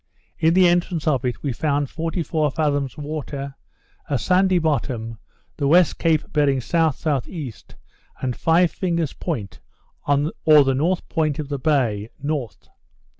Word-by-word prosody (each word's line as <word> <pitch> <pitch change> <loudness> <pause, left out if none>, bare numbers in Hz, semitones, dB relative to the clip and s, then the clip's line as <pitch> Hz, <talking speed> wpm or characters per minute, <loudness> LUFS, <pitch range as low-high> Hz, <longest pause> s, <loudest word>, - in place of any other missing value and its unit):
In 160 +1 +3
the 185 -1 +6
entrance 175 -2 0
of 135 -6 +2
it, 125 - -3
we 140 -4 -1
found 145 +2 0
44 165 -2 -1
fathoms 145 -3 -1
water, 145 -2 -5 0.6
a 140 - +1
sandy 185 +6 +3
bottom, 120 -8 -2 0.4
the 140 - 0
West 170 +3 +4
Cape 160 -2 +1
bearing 145 -3 +3
S.S.E., 150 -1 -1 0.7
and 125 -2 -2
Five 165 +1 +3
Fingers 170 -5 -1
Point, 100 - -5 0.5
or 145 +1 +4
the 135 0 +1
north 170 +7 0
point 155 -3 0
of 150 -2 -5
the 140 -1 -3
bay, 120 -8 0
north. 140 -7 -4
150 Hz, 135 wpm, -22 LUFS, 135-165 Hz, 0.7 s, the